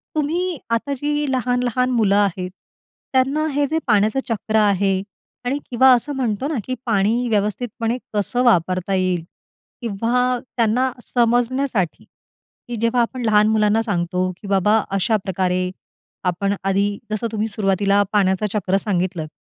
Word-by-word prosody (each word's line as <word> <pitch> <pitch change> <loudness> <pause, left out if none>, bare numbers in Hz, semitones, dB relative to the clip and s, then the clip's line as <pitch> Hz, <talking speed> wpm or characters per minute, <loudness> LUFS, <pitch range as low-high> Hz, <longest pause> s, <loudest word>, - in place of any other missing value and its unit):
तुम्ही 335 +4 -1
आता 230 +5 0
जी 295 +2 -1
लहान-लहान 250 0 0
मुलं 215 -5 +3
आहेत, 190 -3 +1 0.6
त्यांना 270 +4 +2
हे 290 +1 +2
जे 320 - +2
पाण्याचं 215 +3 +3
चक्र 220 -1 -2
आहे 200 -2 +3 0.5
आणि 275 +4 0
किंवा 260 +2 +5
असं 250 +4 +1
म्हणतो 250 0 -1
ना, 315 - -2
की 255 - -3
पाणी 225 +3 +1
व्यवस्थितपणे 225 +3 -1 0.2
कसं 215 +4 0
वापरता 185 -4 +2
येईल 185 -3 0 0.6
किंवा 240 +3 0 0.2
त्यांना 240 +3 +2
समजण्यासाठी, 240 - 0
की 240 - -14
जेव्हा 230 +1 +2
आपण 245 +1 -2
लहान 210 -1 +4
मुलांना 215 0 +3
सांगतो 180 -2 -1
की 205 - -9
बाबा 200 +2 +3 0.2
अशाप्रकारे 185 -3 0 0.6
आपण 195 +3 0
आधी 195 +1 +2 0.2
जसं 215 +2 -1
तुम्ही 220 0 -1
सुरुवातीला 200 -1 +1
पाण्याचं 195 0 +2
चक्र 195 -2 +1
सांगितलंत. 185 -5 -2
220 Hz, 135 wpm, -21 LUFS, 195-250 Hz, 0.6 s, किंवा